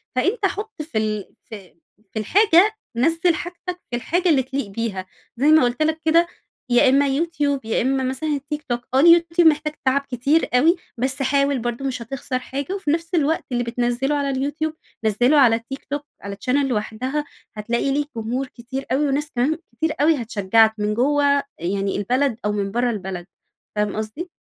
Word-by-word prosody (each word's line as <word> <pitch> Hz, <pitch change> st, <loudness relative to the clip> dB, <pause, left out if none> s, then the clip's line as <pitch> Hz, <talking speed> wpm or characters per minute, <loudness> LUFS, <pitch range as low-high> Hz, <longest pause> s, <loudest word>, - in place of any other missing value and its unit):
فأنتَ 390 Hz, -, +1 dB
حط 415 Hz, -1 st, -3 dB
في 305 Hz, -7 st, -5 dB
ال 215 Hz, -2 st, -2 dB
في 205 Hz, -6 st, -11 dB, 0.4 s
في 220 Hz, -, -2 dB
الحاجة، 400 Hz, -, +4 dB, 0.2 s
نزل 330 Hz, +6 st, +2 dB
حاجتك 355 Hz, +2 st, -6 dB
في -, -, -1 dB
الحاجة 345 Hz, +10 st, 0 dB
اللي 275 Hz, -5 st, +4 dB
تليق 265 Hz, -2 st, -3 dB
بيها، 200 Hz, -2 st, -4 dB, 0.3 s
زي 280 Hz, +4 st, +2 dB
ما 310 Hz, -2 st, +6 dB
قلت 245 Hz, +3 st, 0 dB
لكَ 315 Hz, +1 st, 0 dB
كده 335 Hz, +2 st, +4 dB, 0.4 s
يا 245 Hz, +2 st, +5 dB
إما 280 Hz, +2 st, +4 dB
يوتيوب، 285 Hz, -2 st, -1 dB
يا 225 Hz, -, 0 dB
إما 265 Hz, +2 st, +1 dB
مثلًا 265 Hz, +5 st, -2 dB
التيك 295 Hz, +1 st, -3 dB
توك، 240 Hz, 0 st, -1 dB
آه 265 Hz, -, +4 dB
اليوتيوب 335 Hz, +1 st, +6 dB
محتاج 305 Hz, 0 st, +2 dB
تعب 265 Hz, +2 st, +3 dB
كتير 280 Hz, +7 st, +1 dB
أوي، 305 Hz, +8 st, +5 dB, 0.2 s
بس 260 Hz, +3 st, -1 dB
حاول 275 Hz, 0 st, +2 dB
برضو 240 Hz, +3 st, -3 dB
مش 255 Hz, -2 st, -3 dB
هتخسر 255 Hz, +1 st, -4 dB
حاجة. 280 Hz, +8 st, -5 dB
وفي 380 Hz, -7 st, -1 dB
نفس 330 Hz, +2 st, -1 dB
الوقت 315 Hz, 0 st, +1 dB
اللي 245 Hz, -1 st, 0 dB
بتنزله 245 Hz, +4 st, -1 dB
على 285 Hz, -1 st, 0 dB
اليوتيوب، 290 Hz, +4 st, -2 dB, 0.3 s
نزله 245 Hz, +7 st, +3 dB
على 240 Hz, -5 st, +6 dB
التيك 240 Hz, +4 st, -7 dB
توك 290 Hz, +1 st, -4 dB, 0.2 s
على 200 Hz, 0 st, -6 dB
channel 280 Hz, +2 st, +3 dB
لوحدها 255 Hz, +5 st, -2 dB, 0.3 s
هتلاقي 235 Hz, +5 st, -1 dB
ليك 290 Hz, +1 st, -1 dB
جمهور 245 Hz, +4 st, -2 dB
كتير 255 Hz, +3 st, -7 dB
أوي، 285 Hz, +3 st, +2 dB
وناس 290 Hz, +3 st, -1 dB
كمان 275 Hz, +6 st, +1 dB, 0.2 s
كتير 320 Hz, +3 st, 0 dB
أوي 300 Hz, -3 st, +3 dB
هتشجعك 220 Hz, 0 st, +3 dB
من 210 Hz, 0 st, -1 dB
جوّه 280 Hz, +3 st, +2 dB, 0.2 s
يعني 195 Hz, +3 st, -1 dB
البلد 250 Hz, +4 st, 0 dB
أو 210 Hz, -, +1 dB
من 200 Hz, -1 st, -2 dB
برّه 240 Hz, +2 st, +1 dB
البلد. 190 Hz, -4 st, -5 dB, 0.5 s
فاهم 210 Hz, -1 st, 0 dB
قصدي؟ 220 Hz, +12 st, -5 dB
270 Hz, 180 wpm, -22 LUFS, 235-305 Hz, 0.5 s, ما